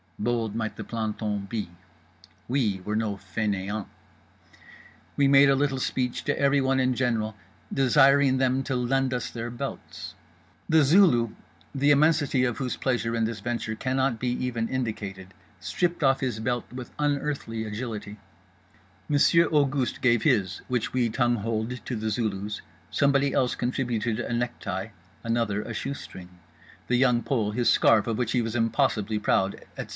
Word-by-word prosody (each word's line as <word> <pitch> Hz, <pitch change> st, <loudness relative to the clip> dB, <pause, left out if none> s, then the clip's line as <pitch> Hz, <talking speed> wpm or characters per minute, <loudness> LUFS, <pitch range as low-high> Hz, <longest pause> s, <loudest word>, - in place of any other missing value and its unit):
Bold 115 Hz, -1 st, -1 dB
might 110 Hz, -2 st, -3 dB
the -, -, -6 dB
planton 105 Hz, -3 st, -3 dB
be; 105 Hz, -5 st, -3 dB, 0.8 s
we 115 Hz, -7 st, 0 dB
were 105 Hz, -, -2 dB
no 110 Hz, -2 st, -1 dB
fainéants. 100 Hz, +1 st, -3 dB, 1.3 s
We 140 Hz, -, +3 dB
made 140 Hz, 0 st, +6 dB
a 135 Hz, -, +5 dB
little 135 Hz, -1 st, 0 dB
speech 125 Hz, -1 st, -2 dB
to -, -, 0 dB
everyone 135 Hz, -1 st, +3 dB
in 130 Hz, 0 st, +2 dB
general 115 Hz, -4 st, -1 dB, 0.4 s
desiring 135 Hz, 0 st, +4 dB
them 130 Hz, 0 st, +2 dB
to 135 Hz, -, -2 dB
lend 130 Hz, +1 st, +1 dB
us 125 Hz, -, -3 dB
their 115 Hz, 0 st, -5 dB
belts. 120 Hz, 0 st, -7 dB, 0.6 s
The 160 Hz, -1 st, +5 dB
Zulu, 140 Hz, -, +5 dB, 0.4 s
the 145 Hz, +1 st, +2 dB
immensity 145 Hz, -3 st, +3 dB
of 120 Hz, -2 st, -1 dB
whose 130 Hz, -2 st, -2 dB
pleasure 115 Hz, -3 st, -1 dB
in 115 Hz, -1 st, +1 dB
this 110 Hz, -1 st, -4 dB
venture 115 Hz, 0 st, -3 dB
cannot 130 Hz, 0 st, 0 dB
be 125 Hz, -, -1 dB, 0.2 s
even 115 Hz, -2 st, -2 dB
indicated, 100 Hz, -7 st, -4 dB, 0.3 s
stripped 175 Hz, -2 st, -1 dB
off 135 Hz, -1 st, +4 dB
his 125 Hz, -5 st, -2 dB
belt 120 Hz, +2 st, -2 dB
with 125 Hz, -1 st, -8 dB
unearthly 145 Hz, -6 st, -1 dB
agility—Monsieur 105 Hz, -, -2 dB
Auguste 140 Hz, -4 st, +1 dB
gave 120 Hz, -3 st, +3 dB
his, 95 Hz, -3 st, +1 dB
which 125 Hz, -3 st, -1 dB
we 125 Hz, -2 st, +1 dB
tongue 120 Hz, +1 st, +1 dB
holed 115 Hz, +3 st, -3 dB
to 125 Hz, -, -3 dB
The 110 Hz, 0 st, -2 dB
Zulu's—somebody 115 Hz, +6 st, -1 dB
else 125 Hz, -2 st, +2 dB
contributed 120 Hz, -3 st, -1 dB
a -, -, -3 dB
necktie—another 105 Hz, -1 st, -3 dB
a 115 Hz, -, -6 dB
shoe 135 Hz, +5 st, -3 dB
string—The 90 Hz, -, -8 dB
Young 125 Hz, -2 st, +3 dB
Pole 110 Hz, -7 st, 0 dB
his 120 Hz, +2 st, +1 dB
scarf, 110 Hz, -2 st, +4 dB
of 115 Hz, -1 st, -2 dB
which 120 Hz, -2 st, -1 dB
he 125 Hz, -, +2 dB
was 115 Hz, +1 st, -4 dB
impossibly 115 Hz, -2 st, +1 dB
proud—etc. 100 Hz, -2 st, -1 dB
120 Hz, 145 wpm, -26 LUFS, 105-130 Hz, 1.3 s, made